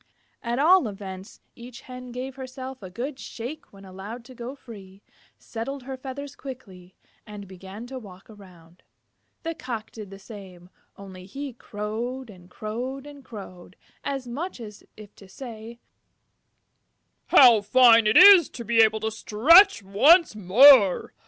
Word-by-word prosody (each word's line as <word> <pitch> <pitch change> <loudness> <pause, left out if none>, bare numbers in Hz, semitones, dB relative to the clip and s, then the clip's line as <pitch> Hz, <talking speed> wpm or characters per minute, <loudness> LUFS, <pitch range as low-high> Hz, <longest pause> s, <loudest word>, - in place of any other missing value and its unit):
At 240 0 -4
all 320 0 +4
events, 195 -2 -10
each 240 0 -12
Hen 250 -1 -11
gave 255 +2 -7
herself 260 0 -9
a 190 - -10
good 260 +8 -7
shake 245 +7 -9
when 195 -1 -16
allowed 200 +6 -10
to 255 - -14
go 245 +2 -9
free, 200 -7 -15 0.3
settled 250 +4 -7
her 265 +1 -7
feathers 270 +2 -9
quickly, 195 -10 -12 0.3
and 205 -1 -10
began 190 +4 -11
to 260 +1 -8
walk 190 -4 -15
around. 180 -5 -18 0.6
The 330 0 -4
Cock 235 -8 -8
did 215 -3 -11
the 195 - -12
same, 190 -4 -14 0.3
only 190 -2 -12
he 275 +5 -8
crowed 230 +3 -7
and 180 -2 -18
crowed 245 +8 -7
and 290 -1 -13
crowed, 185 -5 -12 0.3
as 270 -3 -5
much 290 +7 -6
as 210 -3 -11 0.3
to 195 - -17
say, 230 0 -11 1.5
"How 240 -5 +6
fine 230 +1 +5
it 215 - +3
is 375 -2 +8
to 235 - -10
be 230 +2 0
able 220 -1 +3
to 220 0 -3
stretch 250 - +4
once 280 - +4
more! 210 +1 +5
230 Hz, 145 wpm, -24 LUFS, 200-260 Hz, 1.5 s, is